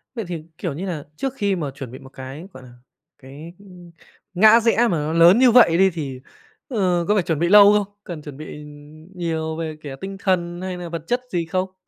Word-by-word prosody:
Vậy 225 -4 -4
thì, 165 -3 -6
kiểu 170 -6 -4
như 180 +7 -5
nà, 165 -6 -4
trước 265 - -3
khi 200 -5 0
mà 150 -6 -4
chuẩn 135 -3 -9
bị 130 - -10
một 135 -1 -14
cái, 135 +6 -9
gọi 130 - -12
là, 125 - -14 0.5
cái, 145 +5 -12
ưm, 180 -3 -15 0.4
ngã 215 +5 +6
rẽ 230 -1 +1
mà 240 0 +4
nó 150 +2 -2
lớn 170 +7 +6
như 255 -2 +6
vậy 220 -9 +6
đi 190 0 +5
thì, 140 -6 -6 0.5
ờ, 185 - 0
có 210 - +3
phải 190 - +2
chuẩn 160 -3 -2
bị 170 +1 +1
lâu 205 0 +8
không? 205 -2 +1 0.2
Cần 165 -4 -8
chuẩn 145 -2 -10
bị 150 -1 -9 0.5
nhiều 160 -2 -3
về, 160 -1 -5
kiểu, 135 -2 -7
tinh 195 0 -6
thần 175 -2 -1
hay 185 -1 -5
là 175 -1 -7
vật 165 -2 -6
chất 245 +1 0
gì 170 -2 -1
không? 185 +3 -3
175 Hz, 230 wpm, -21 LUFS, 155-195 Hz, 0.5 s, lâu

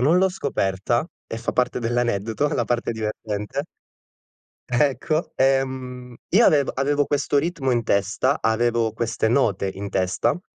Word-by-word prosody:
non 155 +8 +4
l'ho 190 - +4
scoperta, 120 - -1 0.2
e 115 - -4
fa 115 - -3
parte 125 -1 +1
dell'aneddoto, 120 +1 0
la 150 - 0
parte 120 -1 -1
divertente 110 +2 -3 1.1
Ecco, 145 +5 0
ehm, 130 -2 0
io 225 +6 +5
avev 145 -3 +3
avevo 145 +2 +1
questo 145 0 +1
ritmo 150 -3 -1
in 120 -1 +1
testa, 105 +7 +1
avevo 115 0 +1
queste 115 0 -1
note 100 -6 +1
in 100 +1 -6
testa 95 - 0
120 Hz, 135 wpm, -23 LUFS, 110-140 Hz, 1.1 s, io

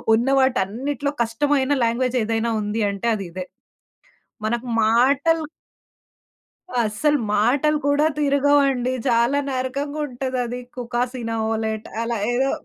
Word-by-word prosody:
ఉన్న 240 +4 0
వాటన్నిటిలో 265 +3 0
కష్టమైన 270 +4 0
లాంగ్వేజ్ 245 +2 +1
ఏదైనా 225 +1 0
ఉంది 210 +2 -1
అంటే 200 +4 -2
అది 195 -2 -5
ఇదే. 185 +1 -5 1.0
మనకు 235 +3 -1 0.2
మాటలు 275 +8 +3 1.4
అస్సలు 260 +8 +1 0.2
మాటలు 275 +8 +2
కూడా 285 +2 +3
తిరగవండి. 280 -3 +2 0.2
చాలా 235 +4 +3
నరకంగా 275 +3 -3
ఉంటదది. 250 -1 -3 0.2
కుకాసీనవొలెట్ 225 -3 -2
అలా 230 0 -1 0.2
ఏదో. 265 +3 +1
250 Hz, 100 wpm, -22 LUFS, 230-280 Hz, 1.4 s, మాటలు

